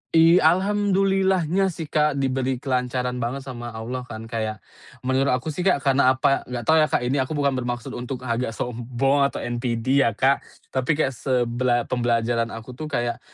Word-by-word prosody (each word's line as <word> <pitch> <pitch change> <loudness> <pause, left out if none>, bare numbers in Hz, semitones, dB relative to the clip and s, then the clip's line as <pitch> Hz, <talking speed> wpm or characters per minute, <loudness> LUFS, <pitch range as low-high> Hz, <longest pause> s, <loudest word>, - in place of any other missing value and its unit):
I 165 +2 +7
alhamdulillah-nya 190 0 +2
sih, 165 -2 -4
Kak, 150 -1 +2
diberi 130 -1 0
kelancaran 125 -1 -1
banget 130 +3 -3
sama 120 -3 -7
Allah 125 +3 -5
kan. 110 0 -7
Kayak 110 -1 -4 0.4
menurut 130 0 +2
aku 140 +5 -4
sih, 180 +5 -2
Kak, 145 -6 +2
karena 135 -1 +4
apa 135 +1 +1
nggak 125 -1 -4
tau 160 0 +4
ya, 155 - +4
Kak, - - 0
ini 135 +3 0
aku 130 +4 -1
bukan 140 -1 +2
bermaksud 120 -2 -3
untuk 125 +1 -6
agak 115 -2 -2
sombong 130 +4 0
atau - - -6
NPD 120 +2 +1
ya, 110 - -1
Kak, 135 +2 +3 0.3
tapi 130 +4 0
kayak 140 -3 +1
sebela 120 -1 0
pembelajaran 120 -1 0
aku 115 +3 -9
tuh 155 +5 -7
kayak, 120 -5 -2
130 Hz, 175 wpm, -23 LUFS, 120-145 Hz, 0.4 s, I